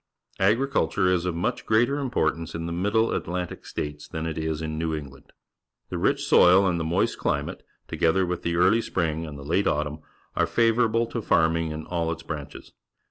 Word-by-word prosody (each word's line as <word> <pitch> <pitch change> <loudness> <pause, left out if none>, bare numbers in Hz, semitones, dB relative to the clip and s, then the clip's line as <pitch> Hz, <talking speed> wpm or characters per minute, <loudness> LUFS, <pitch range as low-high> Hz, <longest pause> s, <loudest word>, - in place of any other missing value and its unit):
Agriculture 100 -3 +2
is 90 0 0
of 90 - -2
much 110 +9 -2
greater 120 +6 +2
importance 85 - -1
in 85 0 -4
the 85 - -4
Middle 105 +6 +1
Atlantic 90 0 -4
States 75 0 -5
than 80 0 -5
it 80 -1 -3
is 80 -1 -2
in 80 -1 -4
New 80 -1 -1
England. 70 -3 -10 0.6
The - - -3
rich - - +1
soil 90 +3 +6
and 90 -2 +1
the - - -1
moist 80 +2 0
climate, - - -2 0.3
together 90 +3 +2
with 90 -1 -3
the 85 0 -1
early 95 +7 +4
spring 80 -5 -2
and 75 -2 -8
the 70 - -9
late 90 +7 +1
autumn, 75 +1 -1 0.4
are - - +2
favourable 115 0 +2
to 115 0 -4
farming 80 -3 +2
in 75 0 -6
all 85 -2 -1
its 85 0 -6
branches. 75 -4 -8
85 Hz, 190 wpm, -25 LUFS, 80-100 Hz, 0.6 s, soil